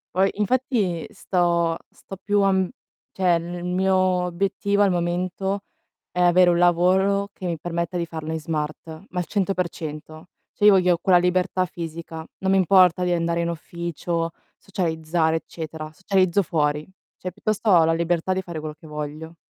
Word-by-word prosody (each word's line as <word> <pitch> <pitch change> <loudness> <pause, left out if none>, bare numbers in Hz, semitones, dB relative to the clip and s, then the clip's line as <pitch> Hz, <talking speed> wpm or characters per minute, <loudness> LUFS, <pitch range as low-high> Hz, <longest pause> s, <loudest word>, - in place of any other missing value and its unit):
Poi 190 +1 +4
infatti 210 -5 0
sto 170 -2 +1
sto 195 - -11
più 205 +2 +1
a, 195 0 +4
mh 190 -1 +1 0.4
cioè 180 -2 +2
il 175 +1 -4
mio 190 +2 +1
obiettivo 185 +2 +1
al 200 - +5
momento 180 +3 -1 0.5
è - - -4
avere 175 0 +5
un 170 - +3
lavoro 185 +3 +3
che 185 - -9
mi 170 -3 -2
permetta 170 +2 -3
di 170 - -1
farlo 160 -1 -6
in 160 - -2
smart, 155 -1 -4 0.2
ma 180 - -3
al 175 - -2
100%. 170 -4 -3 0.2
Cioè 205 - 0
io 210 - +9
voglio 180 -2 +4
quella 180 -1 +4
libertà 180 +1 +1
fisica, 165 -1 -7
non 190 0 0
mi 195 - +4
importa 185 -1 +5
di 180 - 0
andare 170 0 0
in 170 - -1
ufficio, 170 0 -3 0.3
socializzare 160 -3 -1
eccetera, 160 -1 -7
socializzo 190 +1 +2
fuori. 150 -3 -1 0.3
Cioè 185 - -5
piuttosto 215 +3 -1
ho 175 -4 +7
la 165 - +2
libertà 170 +2 0
di 190 - -1
fare 175 -3 -7
quello 155 0 -6
che 160 - -14
voglio. 150 +2 -6
175 Hz, 165 wpm, -23 LUFS, 165-190 Hz, 0.5 s, io